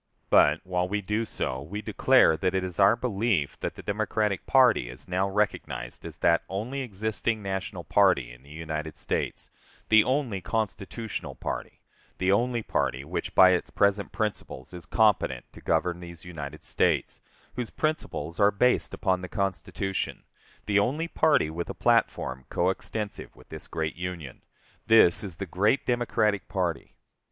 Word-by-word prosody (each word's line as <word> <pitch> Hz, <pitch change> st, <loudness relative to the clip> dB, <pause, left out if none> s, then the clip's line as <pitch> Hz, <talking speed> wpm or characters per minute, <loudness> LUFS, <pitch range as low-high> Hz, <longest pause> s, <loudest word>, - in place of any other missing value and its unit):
But, 75 Hz, +2 st, +5 dB
while 90 Hz, -1 st, -1 dB
we 105 Hz, +1 st, 0 dB
do 105 Hz, +4 st, -1 dB
so, 65 Hz, -10 st, -3 dB
we 100 Hz, +9 st, -6 dB
declare -, -, +4 dB
that 90 Hz, +4 st, -1 dB
it 95 Hz, -, +1 dB
is 90 Hz, 0 st, -4 dB
our 100 Hz, +3 st, +6 dB
belief 110 Hz, -, -1 dB
that -, -, -4 dB
the -, -, -10 dB
Democratic 105 Hz, -1 st, -1 dB
party 125 Hz, -, +4 dB
is 65 Hz, +3 st, -9 dB
now 95 Hz, +2 st, 0 dB
recognized 70 Hz, -11 st, -2 dB
as -, -, -9 dB
that 85 Hz, -, +3 dB
only 115 Hz, +8 st, -3 dB
existing 110 Hz, -1 st, -2 dB
national 95 Hz, -2 st, -4 dB
party 80 Hz, -9 st, +3 dB
in -, -, -14 dB
the 70 Hz, -, -18 dB
United 80 Hz, 0 st, -5 dB
States -, -, -3 dB, 0.4 s
the 110 Hz, -1 st, +7 dB
only 130 Hz, -7 st, -1 dB
constitutional 110 Hz, +2 st, -4 dB
party -, -, -5 dB, 0.4 s
the 95 Hz, +1 st, +1 dB
only 120 Hz, +3 st, +1 dB
party 65 Hz, -8 st, -1 dB
which 90 Hz, +3 st, -4 dB
by 95 Hz, -1 st, +8 dB
its 90 Hz, -, 0 dB
present 100 Hz, 0 st, +1 dB
principles 105 Hz, -10 st, -4 dB
is 90 Hz, -2 st, -8 dB
competent 105 Hz, -, +2 dB
to -, -, -13 dB
govern 85 Hz, +2 st, 0 dB
these 85 Hz, -2 st, -11 dB
United 75 Hz, -4 st, -8 dB
States, -, -, 0 dB, 0.3 s
whose 120 Hz, -2 st, -3 dB
principles 85 Hz, -, -3 dB
are 100 Hz, 0 st, +6 dB
based 125 Hz, +5 st, +1 dB
upon 95 Hz, -2 st, 0 dB
the 90 Hz, -, -7 dB
Constitution 95 Hz, 0 st, -3 dB, 0.4 s
the 105 Hz, -1 st, +3 dB
only 145 Hz, +11 st, 0 dB
party 155 Hz, -, +2 dB
with 85 Hz, +2 st, -5 dB
a -, -, -5 dB
platform 65 Hz, 0 st, +1 dB
coextensive 100 Hz, +4 st, -2 dB
with -, -, -18 dB
this -, -, -8 dB
great 80 Hz, -1 st, -3 dB
Union 85 Hz, -6 st, -6 dB, 0.5 s
this 110 Hz, -6 st, +6 dB
is 95 Hz, -5 st, -5 dB
the 100 Hz, -, -4 dB
great 100 Hz, -, +1 dB
Democratic 110 Hz, -4 st, +1 dB
party. 90 Hz, -4 st, -3 dB
95 Hz, 160 wpm, -27 LUFS, 85-110 Hz, 0.5 s, by